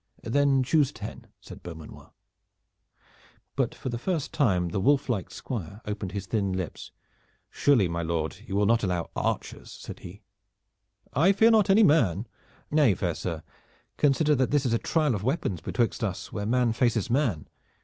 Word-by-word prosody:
"Then 135 +2 +2
choose 145 +1 +2
ten," 110 -1 -9
said - - -12
Beaumanoir. 80 -3 -11 1.4
But - - -1
for - - -5
the 120 -1 -4
first 165 +1 -2
time 90 - +2
the 90 - -2
wolf 135 +6 +2
like 105 -7 -1
squire 100 -4 -6
opened 105 -3 -4
his 100 -1 -4
thin 100 -1 -1
lips. 95 -3 -5 0.6
"Surely, 125 -10 +3
my 85 0 -3
lord, 80 -1 -2
you 95 - -4
will 100 +1 +3
not 115 +2 +3
allow 90 -4 -2
archers," - - -3
said - - -9
he. 100 +5 -11 0.9
"I 170 +9 +4
fear 225 +4 +5
not 215 -3 +4
any 210 +3 +6
man." 115 - +3 0.5
"Nay, 145 -9 +4
fair 85 -1 -1
sir, 80 -1 -5 0.5
consider 150 +1 +3
that 130 -3 +1
this 145 -1 +1
is 120 - +1
a 115 - +2
trial 155 -5 +1
of 105 - -3
weapons 110 - -1
betwixt 120 +6 -1
us 95 -4 -4
where 105 -1 -3
man 120 0 +2
faces 115 -2 0
man. 120 - 0
115 Hz, 170 wpm, -27 LUFS, 95-140 Hz, 1.4 s, any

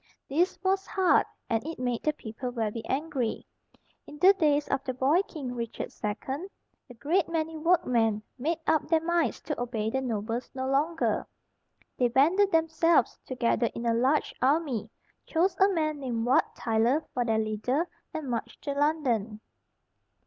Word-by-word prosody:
This 345 +7 +1
was 385 +1 +1
hard, 380 -3 +3 0.2
and 225 -1 0
it 320 +2 -6
made 245 -2 -1
the 305 - +1
people 245 -1 -6
very 230 -2 -2
angry. 270 -4 -2 0.6
In 295 - -10
the 375 +5 +7
days 295 -6 +2
of 275 - 0
the 255 - -3
boy 280 +8 +3
king 265 -6 -6
Richard 235 -2 -5
II, 265 - -3 0.4
a 245 - -11
great 320 +9 +1
many 325 -1 -2
workmen 250 -10 +2 0.2
made 315 +6 0
up 310 -2 +2
their 325 - +3
minds 345 -1 +1
to 300 -5 -4
obey 225 -3 -2
the 265 - 0
nobles 230 0 -3
no 260 0 -2
longer. 300 +5 0 0.7
They 250 - +4
banded 335 +11 +3
themselves 325 -3 +2
together 240 -2 +1
in 235 - -4
a 230 - +3
large 260 +6 +2
army, 265 -6 +1 0.4
chose 350 +3 +1
a 390 +1 +6
man 310 -4 0
named 240 -4 -2
Wat 250 - +2
Tyler 235 +7 +1
for 245 - +1
their 225 -2 +1
leader, 220 +9 0 0.2
and 310 -3 -5
marched 235 -1 -4
to 285 - -2
London. 265 -8 0
270 Hz, 160 wpm, -28 LUFS, 235-320 Hz, 0.7 s, the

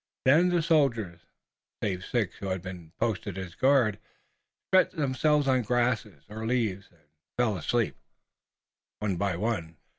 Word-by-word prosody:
Then 160 +7 +5
the 175 -2 +1
soldiers, 120 - +1 0.6
save 90 -2 -1
six 110 -5 -1
who 100 - -6
had 95 -1 -2
been 90 -4 -8
posted 105 -4 -2
as 95 -2 -6
guard, 130 -3 +3 0.7
stretched 185 0 +4
themselves 145 0 +2
on 130 -1 +3
grass 120 0 +1 0.2
or 110 +1 -7
leaves, 110 -6 -1
and 85 -3 -28 0.4
fell 120 -4 +2
asleep, 110 +7 0 1.0
one 100 -4 -2
by 100 -1 0
one. 85 -5 -2
110 Hz, 140 wpm, -28 LUFS, 95-130 Hz, 1.0 s, Then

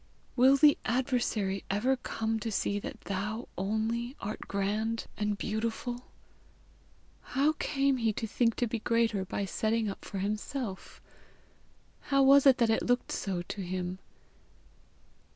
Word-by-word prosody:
Will 265 +2 +6
the 295 +1 +6
Adversary 240 -6 0
ever 235 +7 +2
come 225 -3 -2
to 225 +1 -3
see 205 0 0
that - - -7
thou 210 +4 -3
only 220 +6 -1
art 210 +2 -4
grand 215 +3 -1
and 210 -1 -1
beautiful? 230 +4 -3 1.2
How 280 +4 +1
came 275 -1 +1
he 230 -2 +1
to 225 - -3
think 230 +1 +1
to 245 - +1
be 230 +1 -2
greater 230 -3 +1
by 200 +1 -2
setting 220 +2 0
up - - -10
for 200 - -6
himself? 210 +2 -4 1.0
How 275 -1 +2
was 275 +1 +7
it 265 - +7
that 235 -2 +3
it 220 - +2
looked 245 0 +1
so 185 -3 -2
to 200 - -6
him? 185 0 -3
225 Hz, 140 wpm, -30 LUFS, 200-245 Hz, 1.2 s, was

